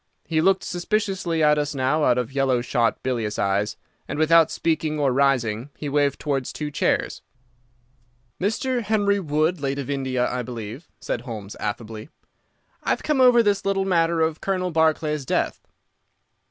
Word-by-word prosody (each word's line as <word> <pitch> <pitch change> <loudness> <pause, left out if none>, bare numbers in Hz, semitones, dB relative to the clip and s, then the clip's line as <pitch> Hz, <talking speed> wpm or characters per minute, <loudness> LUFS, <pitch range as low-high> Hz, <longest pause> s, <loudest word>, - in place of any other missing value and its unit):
He 160 -1 +1
looked 190 +2 +3
suspiciously 185 -3 -1
at 150 0 +4
us 145 0 -2
now 140 +4 +1
out 125 - +3
of 125 0 -2
yellow 135 -3 +2
shot, 120 -1 0
bilious 115 -5 -2
eyes, 100 +1 0 0.3
and, - - -4
without 160 +1 +5
speaking 155 -2 -1
or 140 -3 +2
rising, 125 -3 +1
he 150 - -4
waved 145 -1 +1
towards 135 -4 -2
two 150 -1 -5
chairs. - - 0 1.2
"Mr. 245 +5 0
Henry 205 -2 +1
Wood, 155 0 0
late 140 -1 -1
of 140 0 -4
India, 130 -3 0
I 125 - -2
believe," 120 +4 -7
said 115 - -3
Holmes, 110 -5 -7
affably. 110 +3 -5 0.7
"I've - - -1
come 300 -4 +1
over 245 -2 +6
this 200 -2 +1
little 195 0 0
matter 170 -3 +2
of 160 -1 0
Colonel 185 -2 -1
Barclay's 155 -2 +1
death." - - -2
150 Hz, 155 wpm, -23 LUFS, 125-175 Hz, 1.2 s, over